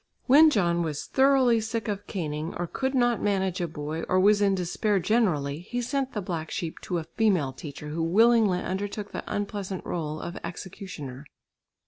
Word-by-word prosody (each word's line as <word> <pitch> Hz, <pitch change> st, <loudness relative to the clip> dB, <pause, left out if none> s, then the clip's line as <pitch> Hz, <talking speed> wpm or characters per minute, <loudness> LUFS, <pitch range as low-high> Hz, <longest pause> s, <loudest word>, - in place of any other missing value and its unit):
When 300 Hz, +5 st, +8 dB
John 175 Hz, -, +2 dB
was 155 Hz, -3 st, -3 dB
thoroughly 265 Hz, -4 st, +4 dB
sick 225 Hz, 0 st, -3 dB
of 205 Hz, -1 st, -4 dB
caning, 155 Hz, -3 st, -4 dB
or 175 Hz, -, -2 dB
could 265 Hz, +10 st, -2 dB
not 240 Hz, -3 st, +2 dB
manage 190 Hz, -3 st, 0 dB
a 175 Hz, -, 0 dB
boy, 155 Hz, +1 st, -5 dB
or 185 Hz, -, +3 dB
was 205 Hz, +2 st, +5 dB
in 200 Hz, -1 st, +3 dB
despair 195 Hz, +3 st, 0 dB
generally, 170 Hz, -8 st, +1 dB
he 225 Hz, +8 st, -4 dB
sent 265 Hz, +2 st, -2 dB
the 210 Hz, -, -3 dB
black 165 Hz, -3 st, -4 dB
sheep 165 Hz, -2 st, -4 dB
to 180 Hz, -, -3 dB
a 165 Hz, -, -2 dB
female 170 Hz, -6 st, +1 dB
teacher, 150 Hz, +1 st, -8 dB
who 160 Hz, +2 st, -3 dB
willingly 210 Hz, +1 st, +4 dB
undertook 205 Hz, +2 st, -4 dB
the -, -, -5 dB
unpleasant 200 Hz, -2 st, -3 dB
rôle 155 Hz, -2 st, -3 dB
of 175 Hz, -, -6 dB
executioner. 170 Hz, -6 st, -7 dB
190 Hz, 175 wpm, -27 LUFS, 165-220 Hz, -, When